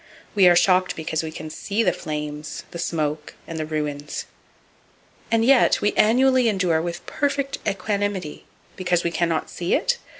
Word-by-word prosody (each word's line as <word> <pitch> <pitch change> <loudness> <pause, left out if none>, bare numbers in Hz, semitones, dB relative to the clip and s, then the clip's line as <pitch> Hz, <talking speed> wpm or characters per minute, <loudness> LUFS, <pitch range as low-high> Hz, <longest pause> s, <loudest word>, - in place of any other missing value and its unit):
We 195 -3 +6
are 175 - +6
shocked 185 +1 +3
because 160 -1 -2
we 160 -1 -5
can 155 0 -7
see 205 +7 -1
the - - +2
flames, 150 -1 -5
the 170 - -7
smoke 155 -3 -2
and 165 -1 -6
the 155 - -3
ruins. 150 -2 -3 1.0
And 225 0 +2
yet, 265 0 +5
we 205 - +1
annually 255 +2 +4
endure 180 -6 +1
with 170 +1 -5
perfect 280 -1 -1
equanimity 200 -4 -2 0.3
(because 175 -2 0
we 170 - 0
can 170 0 0
not 160 -1 -2
see 175 0 0
it?) 485 0 0
175 Hz, 165 wpm, -23 LUFS, 155-210 Hz, 1.0 s, We